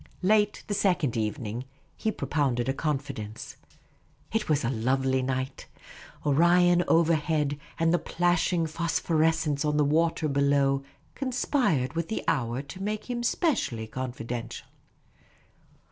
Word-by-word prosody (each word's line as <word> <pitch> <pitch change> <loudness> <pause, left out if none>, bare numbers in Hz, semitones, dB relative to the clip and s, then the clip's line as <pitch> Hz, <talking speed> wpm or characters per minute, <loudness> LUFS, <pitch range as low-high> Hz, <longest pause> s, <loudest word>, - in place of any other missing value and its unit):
Late 210 +1 +2
the 205 - -3
second 180 - +1
evening 110 +1 -3 0.3
he 220 - -1
propounded 135 - -1
a 135 - +1
confidence. 135 -8 -4 0.8
It 220 -4 -1
was 150 -2 +2
a 120 - +1
lovely 130 +2 +1
night; 130 +1 -3 0.6
Orion 175 +4 +4
overhead, 155 -3 +2 0.2
and 165 0 +2
the 175 - +3
plashing 175 0 +1
phosphorescence 160 -2 0
on 150 -1 +1
the 150 - +4
water 160 +2 +2
below 140 -1 +2 0.3
conspired 250 - 0
v;it.h 165 0 -2
the 220 - -2
hour 125 -2 0
to 185 +6 -10
make 215 +4 -3
him 240 -1 -2
specially 240 - 0
confidential. 120 -1 -5
150 Hz, 120 wpm, -27 LUFS, 130-175 Hz, 0.8 s, Orion